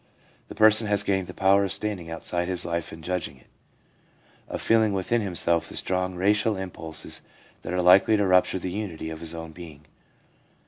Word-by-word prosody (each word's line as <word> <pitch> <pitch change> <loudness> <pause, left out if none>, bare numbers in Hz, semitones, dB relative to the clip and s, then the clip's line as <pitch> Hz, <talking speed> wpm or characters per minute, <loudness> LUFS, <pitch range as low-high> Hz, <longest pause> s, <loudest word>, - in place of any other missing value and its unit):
The - - -10
person 110 +1 +5
has 100 -1 +2
gained 95 -2 0
the - - -8
power 100 +1 +4
of 95 - -1
standing 100 -6 -3
outside 85 +1 -3
his 90 -2 -2
life 85 -1 -3
and 80 0 -11
judging 85 -7 -3
it; 65 - -23 1.0
of - - -5
feeling 110 -2 +3
within 100 +5 0
himself 85 -4 0
the - - -9
strong, 90 0 -1
racial 105 +3 +2
impulses 80 -4 -6 0.4
that - - -6
are 90 0 0
likely 95 +4 +6
to 105 - +1
rupture 90 0 +3
the 90 0 -4
unity 90 -6 -5
of 80 - -7
his 85 0 -5
own 80 -1 -7
being. 80 -3 -12
90 Hz, 185 wpm, -25 LUFS, 85-100 Hz, 1.0 s, likely